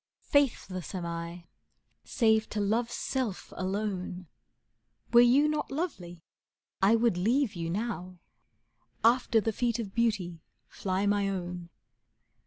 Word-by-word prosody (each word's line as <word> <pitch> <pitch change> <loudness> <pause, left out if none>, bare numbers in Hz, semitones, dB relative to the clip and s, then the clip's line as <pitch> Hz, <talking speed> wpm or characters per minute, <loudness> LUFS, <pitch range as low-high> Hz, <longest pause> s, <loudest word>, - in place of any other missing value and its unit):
Faithless 205 - 0
am 180 -2 -3
I 170 +1 -5 0.6
save 220 -3 +2
to 210 - -3
love's 225 +4 0
self 250 -8 -3
alone. 185 -1 -3 0.9
Were 235 - +9
you 260 +5 +5
not 305 0 -1
lovely 180 - -4 0.6
I 200 +4 +5
would 230 -5 +2
leave 230 +5 +2
you 165 -3 -4
now; 185 -2 -3 0.9
After 235 0 +4
the 220 +1 -1
feet 235 +1 0
of 210 -5 -5
beauty 195 -8 0 0.3
fly 190 +1 -2
my 205 -1 +2
own. 180 -2 -5
205 Hz, 120 wpm, -29 LUFS, 180-235 Hz, 0.9 s, Were